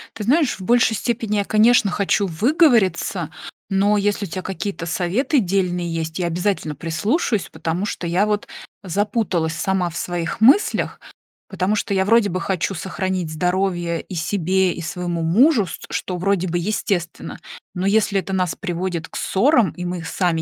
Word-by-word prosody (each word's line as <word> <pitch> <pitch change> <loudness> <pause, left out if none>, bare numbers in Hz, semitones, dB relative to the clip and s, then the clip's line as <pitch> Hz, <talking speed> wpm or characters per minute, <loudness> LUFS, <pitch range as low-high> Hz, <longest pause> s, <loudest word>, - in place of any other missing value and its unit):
Ты 215 - -5
знаешь, 275 - +2
в - - -9
большей 230 +1 +3
степени 225 -2 -1
я, 200 - 0
конечно, 220 -1 +4
хочу 200 +1 +1
выговориться, 200 - +2 0.4
но, 200 +1 +2
если 205 0 0
у 185 - -9
тя 185 - -4
какие-то 190 -2 -4
советы 195 - +1
дельные 180 -3 -1
есть, 160 0 -3
я 180 - -1
обязательно 170 -2 -1
прислушаюсь. 200 - -1
Потому 170 +4 -2
что 180 -4 -4
я 180 +5 +2
вот 210 -1 -1 0.4
запуталась 185 -3 -1
сама 185 0 -1
в 170 - -7
своих 175 +3 -3
мыслях. 275 - +4 0.5
Потому 190 +3 0
что 205 -1 -1
я 190 - +2
вроде 225 -1 +4
бы 185 +1 -3
хочу 190 +1 -1
сохранить 185 -2 -3
здоровье- 180 0 -1
и 185 - -9
себе, 185 +2 +1
и 170 - -7
своему 175 0 -3
мужу, 215 - +4
ст - - -8
что 180 -1 -3
вроде 185 0 0
бы 175 0 -1
естественно. 175 -2 -2 0.4
Но 180 +1 -2
если 200 -1 +2
это 195 +1 -5
нас 185 -2 0
приводит 175 -3 -3
к - - -15
ссорам, 240 +1 +2
и 180 - -7
мы 175 -1 -4
сами 165 -1 0
190 Hz, 170 wpm, -21 LUFS, 175-210 Hz, 0.5 s, конечно